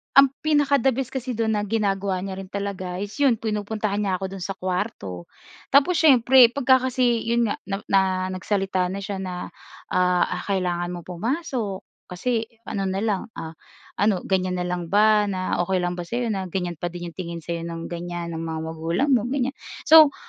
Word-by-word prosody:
ang 275 -1 +8
pinaka 290 -2 +3
the 260 0 +2
best 265 -1 -3
kasi 255 -2 -3
do'n 220 0 0
na 205 - -3
ginagawa 195 -3 0
niya 195 -1 -5
rin 195 - -7
talaga 190 -2 -4
is 205 - -6
'yon 275 -4 +4
pinupuntahan 210 -1 -2
niya 195 -3 0
ako 190 - -4
do'n 195 - -7
sa 195 - -4
kuwarto. 180 - -4 0.5
Tapos 305 +5 +5
siyempre, 260 -4 +7
pagka 260 -1 +3
kasi 245 -2 +1
'yon 235 -2 +2
nga, - - -1
na 195 0 -1
na 195 -1 +6 0.3
nagsalita 190 -1 0
na 195 +2 -4
siya 195 0 -4
na, 180 -2 -5 0.4
ah, 180 -1 +3 0.2
"Kailangan 180 -3 0
mong 175 - -10
pumasok, 220 - -3 0.2
kasi 225 +5 -1 0.2
ano 195 -1 -2
na 190 +1 -1
lang, 210 -4 0
ah 160 0 -8 0.4
ano 200 -2 +2
ganyan 185 -1 +1
na - - -1
lang 175 -1 -3
ba? 215 0 +5
Na 185 -2 -2
okey 190 0 +1
lang 175 0 -1
ba 175 - -3
sa'yo 240 +5 -2
na 195 -3 -2
ganyan 175 -2 -3
pa 175 - -2
din 175 0 -6
'yong - - -29
tingin 170 -2 -5
sa'yo 170 0 -4
ng 165 0 -5
ganyan, 175 0 -4
ng 165 - -4
mga 160 -1 -4
magulang 165 - -1
mo?" 240 -2 +3
Ganyan. 265 0 0 0.3
So, 310 -3 +8
195 Hz, 190 wpm, -24 LUFS, 180-235 Hz, 0.5 s, ang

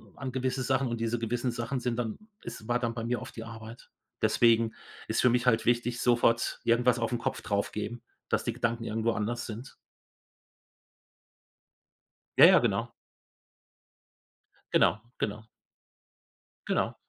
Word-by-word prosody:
an 135 -2 -5
gewisse 130 0 -1
Sachen 130 +1 +1
und 115 -1 -3
diese 115 +1 0
gewissen 120 +2 -1
Sachen 120 +3 -3
sind 125 -2 -2
dann 115 -3 -2 0.3
es 110 - -8
war 120 0 +1
dann 120 -2 -1
bei 115 -1 -5
mir 120 -1 -1
oft - - -9
die 115 - -6
Arbeit. 115 0 -10 0.3
Deswegen 115 -1 +3 0.4
ist - - +1
für 125 - +5
mich 120 +1 +1
halt 115 -2 +3
wichtig, 120 0 +1
sofort 120 -1 +2
irgendwas 120 +1 +3
auf 115 - -1
'n 120 - 0
Kopf - - -3
drauf 100 0 -1
geben, 110 +3 -4 0.3
dass - - +1
die - - -1
Gedanken 115 0 -1
irgendwo 110 +2 0
anders 115 +2 -2
sind. 115 +2 -8 2.6
Ja, - - +10
ja, - - +8
genau. - - 0 1.8
Genau, 110 - +4 0.2
genau. 110 +1 -3 1.2
Genau. - - 0
120 Hz, 150 wpm, -29 LUFS, 115-125 Hz, 2.6 s, Ja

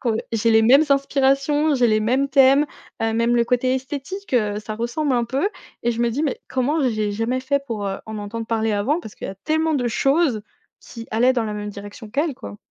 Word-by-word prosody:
qu'on, 235 -4 0
heu - - 0 0.2
j'ai 230 0 +2
les 220 0 +5
mêmes 270 +7 +6
inspirations, 275 +2 +2
j'ai 250 -2 +3
les 215 0 +2
mêmes 255 +6 +1
thèmes, 275 +1 +5 0.4
heu, 225 0 +1
même 230 +1 +2
le 235 -1 +3
côté 250 +2 +1
esthétique, 280 +7 -5
heu, 210 -3 +1
ça 215 0 -6
ressemble 260 +5 -1
un 240 -1 +1
peu 270 - 0 0.3
et 240 - +1
je 235 0 -3
me 235 - +2
dis: 270 +7 -2
«Mais 290 -4 -2
comment 275 +3 0
j'ai 215 -3 -1
jamais 230 +5 -1
fait 280 +2 0
pour, 215 -5 -3
heu, 195 0 -2
en 220 -1 -6
entendre 220 +2 -5
parler 225 -1 0
avant 220 +11 0
parce 220 - -11
qu'il - - -7
y - - -4
a - - -8
tellement 315 +8 0
de 245 -3 0
choses 270 -1 +1 0.4
qui 230 -1 -10
allaient 240 +4 +3
dans 240 -3 0
la 210 -1 -4
même 210 0 -5
direction 205 +2 -10
qu'elle 290 +4 0
quoi.» 100 - -9
240 Hz, 235 wpm, -22 LUFS, 220-275 Hz, 0.4 s, mêmes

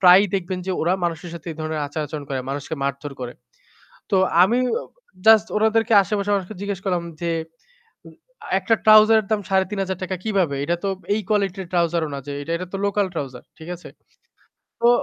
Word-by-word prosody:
প্রায়ই 185 +2 +7
দেখবেন 185 -1 -2
যে 190 - 0
ওরা 170 +3 +2
মানুষের 170 +1 -3
সাথে 170 - -10
এই - - -13
ধরনের 155 0 -2
আচার-আচরণ 150 0 -5
করে, 135 -1 -2
মানুষকে 145 +3 -4
মারধর 140 +1 -3
করে। 125 -1 -5 0.8
তো 195 - +3 0.3
আমি 235 +6 +2 0.2
অ - - -10 0.4
জাস্ট 220 -1 +7
ওনাদেরকে 220 +1 +2
আশেপাশের 205 +1 -1
মানুষকে 195 +1 -3
জিজ্ঞেস 200 -2 -3
করলাম 180 -3 0 0.2
যে 170 - 0 0.8
উ - - -10 0.4
আ - - -10
"একটা 225 +5 +2
trouser 215 +1 +8
এর 205 - -11
দাম 215 -1 +2
৳৩৫০০ 190 -1 -1
কিভাবে? 185 -10 +1
এটা 170 +4 0
তো - - +1 0.3
এই 215 - 0
কোয়ালিটির 195 -3 0
trouser 170 -1 +2
ও - - -6
না 140 - -3
যে 145 - -4 0.2
এটা 185 +1 -5
তো - - -1
local 200 0 +1
trouser।" 135 -5 -5 0.2
ঠিক 160 +2 -10
আছে? 180 - -12 0.9
তো 235 - +5
185 Hz, 185 wpm, -22 LUFS, 160-205 Hz, 0.9 s, trouser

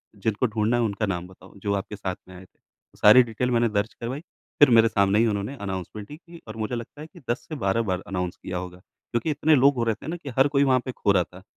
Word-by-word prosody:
जिनको 105 +4 -1
ढूँढ़ना 110 +1 0
है, - - +1
उनका 110 0 -1
नाम 90 -3 -3
बताओ 95 0 -17
जो 100 +1 -1
आपके 100 +1 -3
साथ 95 -2 -4
में 95 - -12
आए 90 +1 -12
थे।" - - -31 0.4
सारी 105 +5 +8
डिटेल 120 +2 -2
मैंने 120 -1 +2
दर्ज 105 +1 -1
करवाई 125 +5 -5 0.4
फिर 145 - +8
मेरे 115 -1 +6
सामने 100 -1 +2
ही 115 - +4
उन्होंने 105 +4 -2
अनाउंसमेंट 100 +1 -6
ही 150 - -8
की 170 0 -15
और 110 - -8
मुझे 110 +2 -3
लगता 120 +5 -8
है 155 - -8
कि 175 - -16
10 120 - -2
से 155 - -4
12 115 -3 0
बार 90 -1 -1
अनाउंस 90 -2 -3
किया 90 - -5
होगा। 90 0 -7 0.3
क्योंकि 120 +6 -1
इतने 150 +1 +3
लोग 140 +1 +4
हो 120 - 0
रहे 115 -2 0
थे 120 - -12
ना 165 - -3
कि 145 - -9
हर 135 +2 +5
कोई 140 - +5
वहाँ 130 -2 +3
पे 130 - -3
खो 105 - 0
रहा 95 -2 +3
था 90 +2 -15
110 Hz, 270 wpm, -25 LUFS, 100-125 Hz, 0.4 s, सारी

